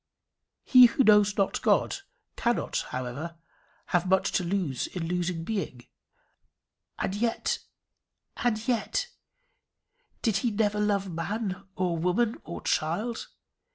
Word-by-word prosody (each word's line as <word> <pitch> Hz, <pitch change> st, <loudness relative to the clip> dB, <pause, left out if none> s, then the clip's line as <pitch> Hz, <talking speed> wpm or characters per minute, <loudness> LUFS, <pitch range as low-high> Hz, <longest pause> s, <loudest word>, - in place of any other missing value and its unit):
He 250 Hz, -2 st, +8 dB
who 250 Hz, +3 st, +2 dB
knows 210 Hz, -2 st, +5 dB
not 195 Hz, -1 st, +1 dB
God -, -, +2 dB, 0.4 s
cannot, 235 Hz, 0 st, 0 dB
however, 130 Hz, +7 st, -5 dB, 0.6 s
have 175 Hz, +1 st, +2 dB
much 190 Hz, 0 st, +3 dB
to 185 Hz, -, +1 dB
lose 175 Hz, -7 st, -1 dB
in 170 Hz, -3 st, -4 dB
losing 175 Hz, -1 st, -1 dB
being. 170 Hz, -, -4 dB, 1.1 s
And -, -, -2 dB
yet 225 Hz, +3 st, 0 dB, 0.8 s
and 225 Hz, -2 st, -1 dB
yet 240 Hz, -4 st, 0 dB, 1.1 s
did 220 Hz, -4 st, +2 dB
he 235 Hz, +5 st, +1 dB
never 210 Hz, -1 st, 0 dB
love 200 Hz, -2 st, 0 dB
man 195 Hz, +3 st, -3 dB
or 175 Hz, -3 st, 0 dB
woman 205 Hz, +7 st, +1 dB
or 170 Hz, -, -7 dB
child? 210 Hz, +10 st, -1 dB
195 Hz, 120 wpm, -28 LUFS, 170-220 Hz, 1.1 s, He